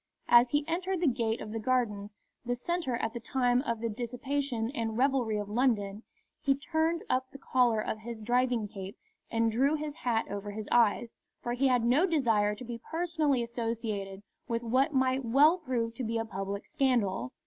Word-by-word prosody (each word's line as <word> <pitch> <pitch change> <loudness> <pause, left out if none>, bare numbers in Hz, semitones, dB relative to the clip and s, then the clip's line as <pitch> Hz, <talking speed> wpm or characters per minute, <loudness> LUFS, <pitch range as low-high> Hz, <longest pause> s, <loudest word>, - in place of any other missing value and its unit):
As 240 +1 +7
he 290 +3 0
entered 365 +2 -1
the 350 - +1
gate 235 -3 0
of 215 - -6
the 225 - -3
Gardens, 215 -4 -1 0.3
the 245 0 -1
centre 320 0 -1
at 225 -1 -2
that 235 - -6
time 245 0 +2
of 235 -5 -3
the 230 - 0
dissipation 245 +1 -2
and 225 -5 -3
revelry 255 -4 +2
of 205 -1 -3
London, 210 -3 0 0.4
he 275 -2 +2
turned 320 +3 0
up 260 0 0
the - - -11
collar 250 -4 +2
of 215 0 -3
his 230 +1 -7
driving 240 0 +1
cape 195 -2 -8 0.3
and 230 0 +1
drew 270 +7 +2
his 300 -1 -4
hat 235 -6 0
over 205 +1 -5
his 215 0 -6
eyes, 235 0 +3 0.3
for 240 - -1
he 265 +3 +2
had 250 -2 +3
no 280 +10 +4
desire 225 - +2
to 250 - -9
be 235 -1 -6
personally 320 -6 +1
associated 225 -4 -4 0.2
with 230 0 -2
what 260 +6 +2
might 260 -1 +1
well 290 +9 +5
prove 240 -7 -2
to 250 - -5
be 230 0 -1
a 225 - -1
public 200 -1 -5
scandal. 235 - 0
240 Hz, 190 wpm, -30 LUFS, 220-270 Hz, 0.4 s, As